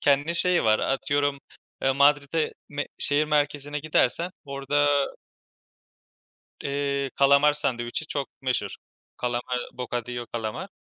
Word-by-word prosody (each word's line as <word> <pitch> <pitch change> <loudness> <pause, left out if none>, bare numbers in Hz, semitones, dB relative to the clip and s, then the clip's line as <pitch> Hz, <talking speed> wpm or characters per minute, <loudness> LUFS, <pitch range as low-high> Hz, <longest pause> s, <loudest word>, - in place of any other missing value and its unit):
kendi 145 +4 +2
şeyi 175 -2 +3
var. 110 0 +4
Atıyorum, 145 +1 0 0.6
Madrid'e 145 +2 +3 0.2
me 145 0 -3
şehir 145 +1 +3
merkezine 145 -1 0
gidersen 155 +3 +1
orada 140 +1 +1 1.8
eee, 140 -1 -1
kalamar 140 +2 +5
sandviçi 125 0 -2
çok 140 -2 -3
meşhur. 130 -1 -1 0.4
Kalamar 125 0 -2
bocadillo 120 -1 -4
kalamar. 110 -2 -4
140 Hz, 100 wpm, -26 LUFS, 130-145 Hz, 1.8 s, kalamar